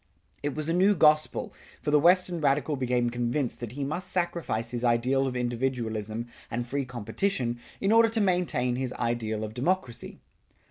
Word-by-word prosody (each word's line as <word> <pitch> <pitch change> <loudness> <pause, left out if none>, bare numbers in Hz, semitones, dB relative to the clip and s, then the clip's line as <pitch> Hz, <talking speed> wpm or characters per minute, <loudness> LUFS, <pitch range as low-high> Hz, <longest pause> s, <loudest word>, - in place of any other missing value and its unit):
It 145 -1 -2
was 155 0 -3
a 165 - +1
new 195 +4 +4
gospel, 155 -2 +3 0.3
for 150 - -2
the 150 - +6
Western 175 +1 +3
radical 145 +1 +2
became 125 -2 0
convinced 120 +1 -1
that 120 -2 -6
he 140 +1 -3
must 165 +6 -3
sacrifice 170 -11 -1
his 120 0 -3
ideal 125 +3 +2
of 125 - -3
individualism 120 -3 -2 0.2
and 120 0 -2
free 140 +2 -2
competition 125 - -2 0.2
in 195 - +1
order 225 0 +6
to 225 0 -1
maintain 175 - +1
his 130 -1 -2
ideal 115 -2 -2
of 110 0 -5
democracy. 130 -1 -2
130 Hz, 170 wpm, -28 LUFS, 120-165 Hz, 0.3 s, the